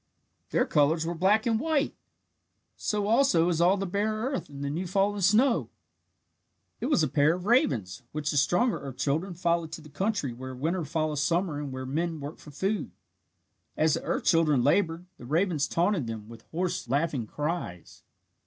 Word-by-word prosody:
Their -, -, +2 dB
colours 155 Hz, +3 st, +2 dB
were 170 Hz, -, -2 dB
black 195 Hz, +7 st, +2 dB
and 225 Hz, -2 st, +2 dB
white! 310 Hz, 0 st, 0 dB, 0.8 s
So 210 Hz, -1 st, -1 dB
also 220 Hz, -7 st, +4 dB
is 170 Hz, -1 st, +1 dB
all 180 Hz, +3 st, +4 dB
the 195 Hz, -, -2 dB
bare 200 Hz, +4 st, 0 dB
earth 260 Hz, -, -3 dB
and 140 Hz, -1 st, -7 dB
the 140 Hz, -, -2 dB
new 175 Hz, +5 st, -3 dB
fallen 200 Hz, +2 st, +1 dB
snow! 230 Hz, +7 st, +3 dB, 1.1 s
It -, -, -2 dB
was 275 Hz, -, +3 dB
a -, -, +2 dB
pair 145 Hz, +4 st, +3 dB
of 180 Hz, 0 st, -7 dB
ravens, 125 Hz, -, +1 dB
which 150 Hz, 0 st, -2 dB
the 145 Hz, -, -1 dB
stronger 180 Hz, -, +2 dB
earth 135 Hz, -2 st, -8 dB
children 155 Hz, +7 st, -1 dB
followed 170 Hz, -2 st, 0 dB
to -, -, -6 dB
the 150 Hz, -, -13 dB
country 185 Hz, -, -1 dB
where 130 Hz, +2 st, -7 dB
winter 160 Hz, +6 st, -1 dB
follows 155 Hz, -1 st, -1 dB
summer 170 Hz, 0 st, 0 dB
and 145 Hz, -2 st, -5 dB
where 130 Hz, 0 st, -5 dB
men 160 Hz, +4 st, -2 dB
work 145 Hz, +2 st, -7 dB
for -, -, -13 dB
food. 195 Hz, +9 st, -2 dB, 0.9 s
As 155 Hz, -1 st, +3 dB
the -, -, -1 dB
earth -, -, -2 dB
children 155 Hz, -7 st, +3 dB
laboured, 165 Hz, +3 st, +2 dB
the -, -, -10 dB
ravens 160 Hz, -1 st, +1 dB
taunted 170 Hz, -, +1 dB
them 110 Hz, -2 st, -6 dB
with 115 Hz, 0 st, -13 dB
hoarse, 175 Hz, -6 st, -2 dB
laughing 140 Hz, -4 st, 0 dB
cries. 150 Hz, -, -4 dB
165 Hz, 180 wpm, -28 LUFS, 145-195 Hz, 1.1 s, also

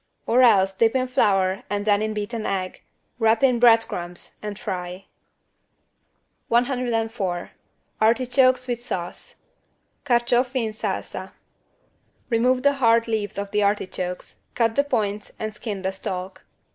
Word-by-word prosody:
Or 245 Hz, +3 st, +3 dB
else 195 Hz, -6 st, +5 dB
dip 225 Hz, +5 st, +2 dB
in 255 Hz, 0 st, +1 dB
flour 195 Hz, -6 st, +2 dB
and 205 Hz, 0 st, -2 dB
then 205 Hz, -1 st, +3 dB
in 215 Hz, 0 st, -2 dB
beaten 215 Hz, +2 st, -4 dB
egg, 190 Hz, -2 st, -3 dB, 0.4 s
wrap 225 Hz, +2 st, +3 dB
in 250 Hz, -3 st, +4 dB
bread 230 Hz, -1 st, +6 dB
crumbs 175 Hz, 0 st, -7 dB
and 210 Hz, -1 st, -5 dB
fry. 185 Hz, -4 st, -5 dB, 1.4 s
104 230 Hz, -7 st, -1 dB, 0.5 s
ARTICHOKES 255 Hz, +3 st, +3 dB
WITH 240 Hz, -1 st, -3 dB
SAUCE 175 Hz, -7 st, -6 dB, 0.6 s
(Carciofi 245 Hz, 0 st, +1 dB
in 220 Hz, -, -3 dB
salsa) 215 Hz, -, -5 dB, 1.0 s
Remove 250 Hz, +2 st, +2 dB
the 285 Hz, 0 st, +4 dB
hard 230 Hz, -1 st, +4 dB
leaves 215 Hz, -3 st, -2 dB
of 200 Hz, 0 st, -4 dB
the 210 Hz, -, +1 dB
artichokes, 185 Hz, -3 st, -2 dB
cut 230 Hz, -1 st, +2 dB
the 280 Hz, -, +3 dB
points 210 Hz, -7 st, -2 dB
and 215 Hz, 0 st, -4 dB
skin 210 Hz, -3 st, -6 dB
the 190 Hz, -, 0 dB
stalk. 190 Hz, -1 st, -6 dB
220 Hz, 135 wpm, -23 LUFS, 195-245 Hz, 1.4 s, bread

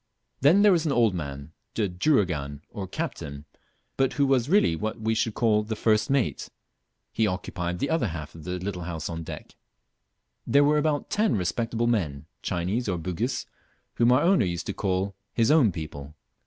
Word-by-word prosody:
Then 165 Hz, +9 st, +5 dB
there 210 Hz, -, +7 dB
was 170 Hz, -3 st, +2 dB
an -, -, +1 dB
old 115 Hz, -6 st, +3 dB
man, 70 Hz, -3 st, -6 dB, 0.2 s
the 105 Hz, -3 st, +1 dB
"juragan," 90 Hz, -, 0 dB
or 95 Hz, -2 st, -5 dB
captain, 70 Hz, -5 st, -5 dB, 0.5 s
but 135 Hz, -1 st, +2 dB
who 140 Hz, -, +2 dB
was 135 Hz, -1 st, +2 dB
really 190 Hz, -, +4 dB
what 110 Hz, +6 st, -3 dB
we 110 Hz, +1 st, 0 dB
should 110 Hz, -1 st, 0 dB
call 110 Hz, -2 st, +3 dB
the 110 Hz, +1 st, -4 dB
first 110 Hz, -1 st, +2 dB
mate; 135 Hz, -4 st, 0 dB, 0.6 s
he 110 Hz, -, +2 dB
occupied 90 Hz, -2 st, -3 dB
the 140 Hz, -, -2 dB
other 160 Hz, -8 st, +1 dB
half 80 Hz, -4 st, -6 dB
of 80 Hz, -, -11 dB
the 90 Hz, +2 st, -3 dB
little 90 Hz, -1 st, -4 dB
house 85 Hz, -2 st, -4 dB
on 85 Hz, -1 st, -4 dB
deck. 80 Hz, -, -8 dB, 0.9 s
There 140 Hz, +1 st, +5 dB
were 150 Hz, +1 st, +4 dB
about 150 Hz, -1 st, -1 dB
ten 215 Hz, +1 st, +2 dB
respectable 115 Hz, +5 st, -1 dB
men, 80 Hz, -12 st, 0 dB, 0.2 s
Chinese 95 Hz, +7 st, -1 dB
or 90 Hz, -, 0 dB
Bugis, 95 Hz, +10 st, -2 dB, 0.5 s
whom 120 Hz, +1 st, +3 dB
our 130 Hz, +4 st, +4 dB
owner 185 Hz, -, +4 dB
used 85 Hz, -1 st, -3 dB
to -, -, -3 dB
call 95 Hz, 0 st, -1 dB, 0.2 s
"his 115 Hz, +2 st, +3 dB
own 145 Hz, -10 st, +5 dB
people." 75 Hz, -3 st, -7 dB
105 Hz, 180 wpm, -26 LUFS, 85-130 Hz, 0.9 s, there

